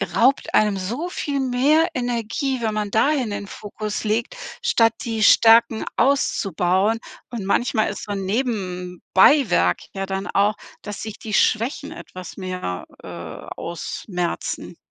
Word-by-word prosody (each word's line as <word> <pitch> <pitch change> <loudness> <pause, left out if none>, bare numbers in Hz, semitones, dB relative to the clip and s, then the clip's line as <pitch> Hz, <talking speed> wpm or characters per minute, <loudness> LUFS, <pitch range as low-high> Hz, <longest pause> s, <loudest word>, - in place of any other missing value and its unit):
raubt 265 +4 +3
einem 210 -1 +4
so 235 - -3
viel 285 -5 -3
mehr 275 +6 +3
Energie, 245 +1 -2
wenn 220 -2 0
man 210 -1 -2
dahin 260 +2 +2
den 205 -1 -5
Fokus 210 0 -5
legt, 225 - -1 0.3
statt 230 - +3
die 225 -2 -1
Stärken 225 +1 +6
auszubauen 200 - +2 0.3
und 225 -5 -5
manchmal 220 +2 +1
ist - - -6
so 205 - -6
'n 195 -1 -3
Nebenbeiwerk 190 - +2
ja 195 0 -3
dann 195 +1 -3
auch, 205 +2 +2 0.3
dass 210 -1 -7
sich 220 -1 -7
die 215 -2 -6
Schwächen 250 +6 +1
etwas 185 -1 -9
mehr, 185 - -4 0.2
äh, - - -10 0.5
ausmerzen. 175 +1 -4
215 Hz, 135 wpm, -22 LUFS, 195-245 Hz, 0.5 s, Stärken